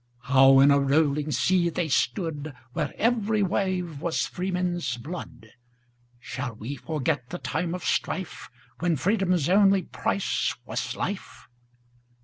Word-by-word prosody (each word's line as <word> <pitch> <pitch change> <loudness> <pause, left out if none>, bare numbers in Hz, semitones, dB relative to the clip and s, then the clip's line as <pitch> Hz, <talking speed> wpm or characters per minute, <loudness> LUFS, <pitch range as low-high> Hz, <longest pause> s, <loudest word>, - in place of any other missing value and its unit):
How 135 +1 +6
in 140 +1 +7
a 140 - +5
rolling 145 +1 +2
sea 170 +6 +2
they 170 0 -2
stood, 155 -2 -1 0.2
Where - - -2
every 220 -2 +1
wave 180 -5 -1
was 170 -1 0
freemen's 180 -7 -2
blood,—Shall 120 -3 -9
we 115 +6 -6
forget 145 -3 -2
the 175 - -4
time 170 +1 -2
of 180 - -7
strife, 190 -2 -2 0.3
When 170 -1 +1
freedom's 180 - +1
only 195 0 +4
price 195 +3 -1
was - - -3
life? 200 -1 -5
160 Hz, 125 wpm, -26 LUFS, 135-180 Hz, 0.3 s, in